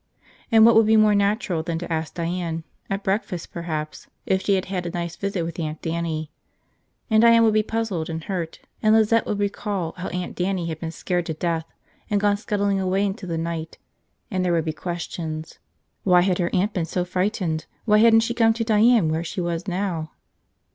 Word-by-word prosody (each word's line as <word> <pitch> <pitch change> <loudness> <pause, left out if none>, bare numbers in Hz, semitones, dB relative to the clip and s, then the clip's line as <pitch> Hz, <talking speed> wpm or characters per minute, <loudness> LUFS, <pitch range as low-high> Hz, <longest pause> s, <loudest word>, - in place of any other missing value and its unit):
And 225 -1 +7
what 230 - +7
would 220 -1 +5
be 220 0 +5
more 215 -1 +5
natural 200 -4 +1
than 165 0 -3
to 170 0 -4
ask 160 -2 -3
Diane, 170 -1 -2 0.3
at 195 +1 -2
breakfast 190 -3 -2
perhaps, 155 -3 -5 0.2
if 190 0 +1
she 200 - +2
had 190 - -1
had 180 -2 -3
a - - -2
nice 170 0 -4
visit 200 -3 -2
with 165 +1 -5
Aunt 155 -1 -3
Dannie. 160 -2 -2 0.8
And 220 0 +5
Diane 230 0 +6
would 220 -1 +4
be 215 - +4
puzzled 215 -7 -2
and 160 0 -4
hurt, 170 -4 -4 0.2
and 215 0 +5
Lizette 225 +1 +3
would 210 - -1
recall 200 -4 -2
how 180 - -4
Aunt 180 0 -4
Dannie 185 -1 -1
had 160 -1 -5
been 165 - -4
scared 175 +2 -2
to 160 - -3
death 165 0 -2 0.4
and 205 - +2
gone 205 0 +2
scuttling 200 -1 0
away 190 +1 +1
into 195 -1 -4
the 165 -1 -2
night, 165 0 -4 0.5
and 185 -2 0
there 180 -1 +1
would 165 -1 +1
be 155 - -1
questions 160 -2 -5 0.2
– - - -49
why 180 -2 +5
had 185 0 +1
her 175 -1 +1
aunt 200 +4 +1
been 175 -3 -1
so 180 +2 -2
frightened, 180 -4 -1 0.2
why 210 -2 +5
hadn't 225 0 +6
she 230 +1 -1
come 225 -1 +4
to 230 +1 -2
Diane, 220 -3 +4
where 160 - 0
was 170 - -4
she 180 - -3 0.3
now 180 -4 -2
180 Hz, 210 wpm, -23 LUFS, 165-210 Hz, 0.8 s, And